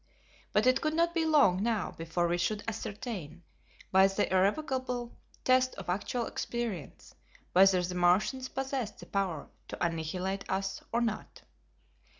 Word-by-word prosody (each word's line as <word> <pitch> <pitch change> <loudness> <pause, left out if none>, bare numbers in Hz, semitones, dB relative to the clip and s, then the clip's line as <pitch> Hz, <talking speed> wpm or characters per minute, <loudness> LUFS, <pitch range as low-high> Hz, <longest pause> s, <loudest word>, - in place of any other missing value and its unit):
But 210 - +3
it 255 +1 +4
could 310 0 0
not 335 +1 +2
be 330 -2 +1
long 270 - +5
now 220 -3 0
before 165 +1 -1
we 175 +1 0
should 205 +4 -1
ascertain, 205 - -5 0.5
by 190 +1 +7
the 195 0 -1
irrevocable 245 +4 0 0.3
test 255 0 +3
of 190 -2 -8
actual 230 +5 -1
experience, 230 - -5 0.4
whether 185 0 +6
the 180 +1 -3
Martians 185 +9 +2
possessed 265 -5 -3
the - - -11
power 190 -6 -2 0.2
to - - -2
annihilate 180 +4 -3
us 190 0 -2
or 235 - +1
not. 225 -3 -3
200 Hz, 145 wpm, -31 LUFS, 180-250 Hz, 0.5 s, by